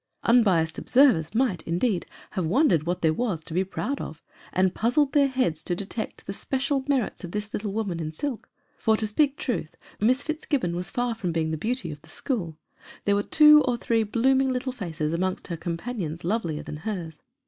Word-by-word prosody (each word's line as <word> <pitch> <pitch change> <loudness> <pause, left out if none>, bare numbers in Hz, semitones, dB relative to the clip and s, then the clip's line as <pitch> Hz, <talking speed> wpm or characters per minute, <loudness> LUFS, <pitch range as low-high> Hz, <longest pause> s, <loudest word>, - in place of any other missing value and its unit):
Unbiassed 190 -9 +3
observers 225 - +4
might, 225 -9 +1
indeed, 180 +3 0 0.2
have 185 - -2
wondered 175 - +3
what 175 0 -1
there 160 -1 +4
was 185 -5 -2
to 160 - -8
be 185 +3 +2
proud 260 +8 -3
of, 160 +1 -8 0.3
and 185 0 +2
puz 235 +4 0
zled 290 -3 +4
their 285 -2 +4
heads 255 - 0
to 175 - -1
detect 205 +4 -5
the 195 - -4
special 270 +5 -1
merits 265 -8 0
of 175 - -5
this 210 0 -4
little 205 -1 -2
woman 200 -5 -2
in 155 -1 -3
silk 250 - -4 0.3
for, 220 -1 +3
to 220 - 0
speak 275 +7 +1
truth, 355 - -3 0.2
Miss 255 +5 +3
Fitzgibbon 285 - -1
was 180 +1 -3
far 245 +2 -1
from 195 -6 -3
being 160 -1 0
the - - 0
beauty 220 - -2
of 150 -1 -9
the 160 - -19
school: 170 - -3 0.5
there 200 - +3
were 200 - +2
two 300 +5 +7
or 245 -2 +1
three 230 -1 +1
blooming 260 +5 +2
little 255 +1 -2
faces 165 -8 -3
amongst 185 +2 -2
her 170 - -2
companions 170 -1 -4
lovelier 170 -5 -1
than 150 - -6
hers. 165 -4 -5
205 Hz, 200 wpm, -26 LUFS, 170-255 Hz, 0.5 s, two